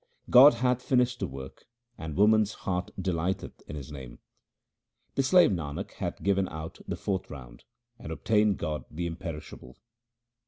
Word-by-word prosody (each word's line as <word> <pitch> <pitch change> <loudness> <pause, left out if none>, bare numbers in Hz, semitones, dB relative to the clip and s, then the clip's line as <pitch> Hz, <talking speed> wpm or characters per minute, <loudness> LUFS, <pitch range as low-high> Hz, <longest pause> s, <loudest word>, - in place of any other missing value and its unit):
God 130 +1 +9
hath 125 +1 +1
finished 125 -1 +1
the - - -1
work, 65 0 -10 0.3
and 80 -6 -6
woman's 105 0 +4
heart 90 -1 -1
delighteth 90 0 -2
in 75 - -6
His 70 -1 -8
name. 65 -4 -9 1.0
The - - +2
slave 175 +4 +5
Nanak 75 -6 -4
hath - - -5
given 95 -1 +2
out 80 +1 -7
the - - -2
fourth 95 -2 -3
round, - - -11 0.3
and 80 - -7
obtained 105 +4 +2
God 75 -5 -3
the 85 +3 -4
Imperishable. 80 -6 -7
90 Hz, 150 wpm, -28 LUFS, 75-110 Hz, 1.0 s, God